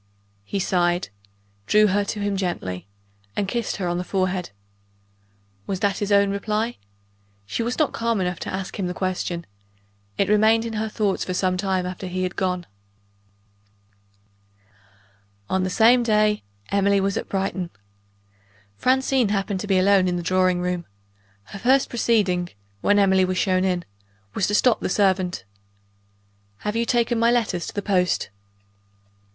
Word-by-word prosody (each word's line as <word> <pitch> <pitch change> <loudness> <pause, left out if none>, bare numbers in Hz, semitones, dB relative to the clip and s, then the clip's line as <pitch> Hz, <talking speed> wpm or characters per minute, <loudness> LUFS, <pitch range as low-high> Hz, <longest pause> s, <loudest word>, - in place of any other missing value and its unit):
He 150 - -4
sighed 180 -2 +1 0.6
drew 210 - +5
her 205 0 +2
to 205 - -4
him 205 -1 -1
gently 95 - -3 0.5
and 200 - -1
kissed 235 +2 -2
her 185 -2 -3
on 175 0 -1
the - - -2
forehead. 185 -1 -1 1.2
Was 190 - -2
that 200 -1 +1
his 205 0 -2
own 200 0 +4
reply? 215 +3 -2 0.7
She 105 - -3
was 235 +2 -2
not 305 -3 +1
calm 230 -2 0
enough 180 -2 -2
to - - -5
ask 190 +1 -5
him 185 - -1
the 180 - -4
question: 180 -2 -2 0.7
it 195 - +2
remained 220 +2 +4
in 230 - -4
her 220 0 -2
thoughts 210 -3 0
for 185 - -3
some 185 0 +1
time 190 -1 -1
after 185 +1 -5
he 185 +1 -2
had 185 0 -3
gone......... 180 -2 -1 2.9
On 190 - +2
the 185 - 0
same 235 +6 +5
day 215 -2 +2 0.3
Emily 200 0 +3
was 195 0 0
at - - -4
Brighton. 190 -2 -2 1.1
Francine 260 -2 +2
happened 200 -1 -1
to 205 - -5
be 195 -2 +3
alone 190 0 +4
in 180 - 0
the 175 - -3
drawing 185 0 +2
room. 180 -1 -2 0.6
Her 200 - -10
first 265 +5 +3
proceeding, 200 -7 +1 0.3
when 205 - +3
Emily 190 -2 +4
was 185 0 -1
shown 185 -1 +2
in, 180 -2 0 0.5
was 185 - 0
to 210 - +1
stop 235 0 +4
the - - -2
servant. 185 -2 +1 1.2
"Have 210 +1 -3
you 230 +1 +1
taken 235 -1 +1
my 230 +1 +4
letter 230 -7 +1
to - - -6
the 205 - -2
post?" 180 - +1
195 Hz, 160 wpm, -23 LUFS, 185-215 Hz, 2.9 s, drew